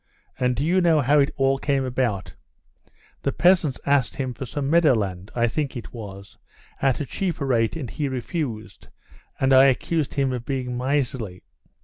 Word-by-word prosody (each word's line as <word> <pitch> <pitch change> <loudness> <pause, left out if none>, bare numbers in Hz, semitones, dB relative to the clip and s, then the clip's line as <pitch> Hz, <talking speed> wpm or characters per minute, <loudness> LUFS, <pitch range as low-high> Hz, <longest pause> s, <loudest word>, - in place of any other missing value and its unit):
And 125 -1 +1
do 140 - -1
you 185 +3 +3
know 165 -3 +4
how 145 +3 +4
it 140 - +3
all 135 0 +2
came 135 -2 0
about? 120 -7 -2 0.9
The 140 - 0
peasants 175 -6 +3
asked 140 -3 +2
him 130 -3 -3
for 130 +2 -7
some 140 +1 -3
meadowland, 110 - +2
I 120 -1 +2
think 140 +2 -2
it 120 - -9
was, 100 -4 -10 0.4
at 135 -2 +2
a 145 - -2
cheaper 165 +1 -3
rate, 115 -2 +1
and 150 -6 -4
he 145 +5 -3
refused, 130 -4 -5 0.5
and 135 0 +3
I 130 +1 +8
accused 140 +3 0
him 135 -2 +1
of 125 -2 -4
being 125 -2 -3
miserly. 125 -7 -2
135 Hz, 170 wpm, -24 LUFS, 120-145 Hz, 0.9 s, I